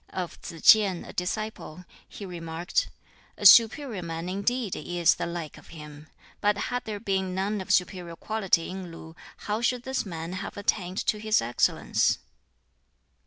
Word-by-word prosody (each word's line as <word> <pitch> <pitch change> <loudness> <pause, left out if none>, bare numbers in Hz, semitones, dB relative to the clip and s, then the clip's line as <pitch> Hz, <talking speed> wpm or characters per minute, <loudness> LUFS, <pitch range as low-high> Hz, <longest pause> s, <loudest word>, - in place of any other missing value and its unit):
Of 180 -2 -5
Tsz 165 -2 -9
tsien, 205 -6 +6
a - - -10
disciple, 180 -2 -4 0.2
he 205 - -8
remarked, 170 0 -2 0.5
"A 205 - -6
superior 230 - +6
man 165 +1 -5
indeed 200 +3 -1
is 175 +1 +2
the - - -4
like 170 -3 -6
of - - -18
him! 150 -1 -11 0.3
But 205 0 +2
had 245 +4 -3
there 210 -2 -4
been 190 -3 -1
none 200 +2 -1
of 190 - -9
superior 180 -2 0
quality 195 -3 0
in 185 -2 -7
Lu, 160 0 -11 0.3
how 210 +2 -1
should 245 0 0
this 265 +1 -2
man 170 -3 -6
have 185 - -6
attained 190 -2 -1
to 210 - +1
this 215 0 +2
excellence?" 120 +1 +1
185 Hz, 160 wpm, -27 LUFS, 170-215 Hz, 0.5 s, tsien